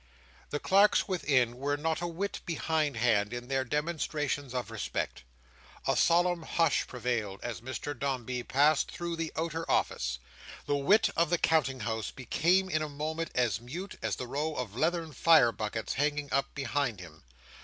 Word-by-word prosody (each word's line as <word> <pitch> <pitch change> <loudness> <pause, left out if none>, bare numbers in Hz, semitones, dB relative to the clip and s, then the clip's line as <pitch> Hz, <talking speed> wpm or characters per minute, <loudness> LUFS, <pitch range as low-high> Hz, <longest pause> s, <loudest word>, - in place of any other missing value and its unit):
The 145 - -2
clerks 200 +5 +4
within 130 - +1
were 145 +2 -1
not 160 +2 -1
a 175 - -1
whit 185 +4 -4
behind 155 -4 -1
hand 110 -3 +2
in 120 +1 -6
their 135 -1 +1
demonstrations 150 -1 -2
of 125 -2 -3
respect. 105 - -3 0.6
A - - +2
solemn 175 0 +3
hush 165 -1 +1
prevailed, 115 -5 -2
as 120 -3 -4
Mr 130 +4 -4
Dombey 130 -3 -2
passed 145 +4 +3
through 170 -1 -4
the 165 -1 -3
outer 165 0 -2
office. 60 0 0 0.5
The 145 - +1
wit 190 +11 +4
of 170 -1 +2
the 175 - +3
Counting 140 -6 +2
House 110 0 -2
became 175 +9 +1
in 155 -4 0
a 155 - -2
moment 155 +3 -3
as 115 -4 +1
mute 170 +11 -6
as - - -1
the 125 - -5
row 150 +5 -2
of 115 -6 -4
leathern 165 +2 0
fire 160 -6 +6
buckets 110 0 -3
hanging 145 0 -1
up 140 +1 0
behind 135 -5 -1
him. 80 -3 -12
145 Hz, 165 wpm, -30 LUFS, 120-165 Hz, 0.6 s, fire